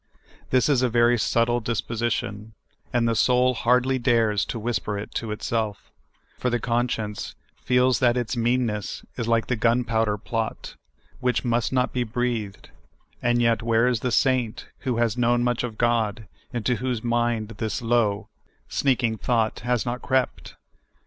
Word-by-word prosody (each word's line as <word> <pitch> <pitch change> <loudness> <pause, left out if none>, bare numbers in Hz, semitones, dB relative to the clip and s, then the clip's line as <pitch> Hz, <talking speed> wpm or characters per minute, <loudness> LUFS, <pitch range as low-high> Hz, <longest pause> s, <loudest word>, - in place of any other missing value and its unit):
This 130 -1 +3
is 140 -4 +3
a 125 - +2
very 120 +1 +4
subtle 120 +2 +2
disposition, 115 -2 -3 0.4
and 120 -1 +2
the 115 - +2
soul 125 +2 +3
hardly 125 +2 +2
dares 115 -5 +2
to - - -5
whisper 110 -2 -2
it 100 - -7
to 115 - -3
itself, 105 -1 -3 0.5
for 125 - 0
the 120 0 0
conscience 115 -3 -2 0.3
feels 125 -2 +3
that 125 -1 +3
its 120 +1 -2
meanness 115 -3 -1
is 115 -2 -3
like 115 -1 +2
the 125 - -1
gunpowder 115 -2 +1
plot, 115 +1 -4 0.4
which 125 +1 0
must 120 0 +1
not 125 -1 +1
be 125 - 0
breathed: 115 -3 -3 0.5
and 120 0 +2
yet, 115 -1 +3
w^iere 115 +1 +2
is 120 - 0
the 125 +2 -2
saint 125 -3 +1
who 125 -4 -2
has 120 0 +1
known 120 0 +3
much 120 0 0
of 115 -3 -5
God, 115 -3 0 0.2
into 120 -1 0
whose 125 -1 -2
mind 120 -2 0
this 110 +2 -2
low, 115 -3 +1 0.4
sneak 130 -2 +1
ing 110 -2 0
thought 115 -3 0
has 120 0 0
not 125 +1 -3
crept 130 -1 -1
120 Hz, 160 wpm, -24 LUFS, 110-125 Hz, 0.5 s, very